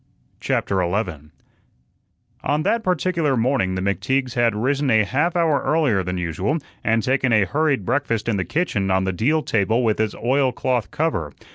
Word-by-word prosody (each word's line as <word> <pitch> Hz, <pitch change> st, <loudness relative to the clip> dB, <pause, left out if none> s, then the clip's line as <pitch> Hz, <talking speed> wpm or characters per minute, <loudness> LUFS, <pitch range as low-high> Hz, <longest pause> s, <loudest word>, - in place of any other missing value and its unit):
CHAPTER 95 Hz, -1 st, 0 dB
11 85 Hz, -5 st, -3 dB, 1.1 s
On 150 Hz, +2 st, 0 dB
that 230 Hz, +7 st, +1 dB
particular 175 Hz, -, 0 dB
morning 115 Hz, -6 st, +1 dB
the 95 Hz, -, -2 dB
McTeagues 125 Hz, +6 st, -1 dB
had 120 Hz, -3 st, +2 dB
risen 135 Hz, +5 st, 0 dB
a 110 Hz, -2 st, +4 dB
half 145 Hz, -, 0 dB
hour 165 Hz, -4 st, +2 dB
earlier 145 Hz, -11 st, +1 dB
than 90 Hz, 0 st, -3 dB
usual 90 Hz, -, -1 dB, 0.3 s
and 115 Hz, -1 st, +1 dB
taken 130 Hz, -1 st, +1 dB
a 105 Hz, -3 st, +4 dB
hurried 140 Hz, -5 st, 0 dB
breakfast 115 Hz, -4 st, -1 dB
in 110 Hz, -3 st, +1 dB
the 95 Hz, -, 0 dB
kitchen 105 Hz, -, -1 dB
on 95 Hz, 0 st, +2 dB
the 95 Hz, 0 st, -1 dB
deal 150 Hz, -, +1 dB
table 110 Hz, +1 st, +1 dB
with 110 Hz, -2 st, +1 dB
its 110 Hz, -1 st, 0 dB
oilcloth 125 Hz, -4 st, 0 dB
cover. 95 Hz, -, -2 dB
120 Hz, 165 wpm, -21 LUFS, 100-145 Hz, 1.1 s, a